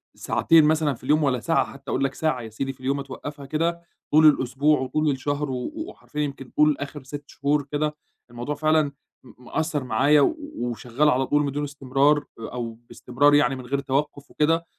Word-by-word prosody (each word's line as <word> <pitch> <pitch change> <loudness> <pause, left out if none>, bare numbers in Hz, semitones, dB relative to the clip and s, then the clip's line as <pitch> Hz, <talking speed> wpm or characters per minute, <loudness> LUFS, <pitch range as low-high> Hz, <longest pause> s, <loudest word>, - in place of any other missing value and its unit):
ساعتين 165 -2 +4
مثلًا 155 -2 +2
في 120 - -14
اليوم 150 +3 +3
ولا 130 -3 +1
ساعة، 165 +7 +1
حتّى 135 0 -12
أقول - - 0
لك 135 -1 0
ساعة 155 -6 -1
يا 115 - -8
سيدي 135 +5 -4
في 130 - -27
اليوم 135 +2 -1
أتوقّفها 140 +1 -7
كده، 165 +4 -1 0.3
طول 155 +1 +6
الأسبوع 140 +1 +4
وطول 145 +3 0
الشهر 145 +1 -2
و 125 - -3
وحرفيًا 320 - -6
يمكن 140 -3 -4
طول 150 -1 +4
آخِر 140 0 -6
6 145 +2 -7
شهور 145 +1 0
كده 150 +1 -1 0.3
الموضوع 120 +5 -4
فعلًا 155 -1 +2 0.3
م 125 0 -17
مأثّر 155 +1 -2
معايا 135 +5 +4
و 315 - +3 0.2
وشغّال 120 +4 0
على 130 -1 +2
طول 145 0 +2
بدون 145 +1 -2
استمرار، 140 +1 +1 0.2
أو 115 0 -5 0.2
باستمرار 145 +4 +2
يعني 135 -2 +4
من 130 -1 -8
غير 140 +3 -1
توقف 140 +1 -2
وكده، 165 +2 +1
145 Hz, 185 wpm, -24 LUFS, 130-150 Hz, 0.3 s, طول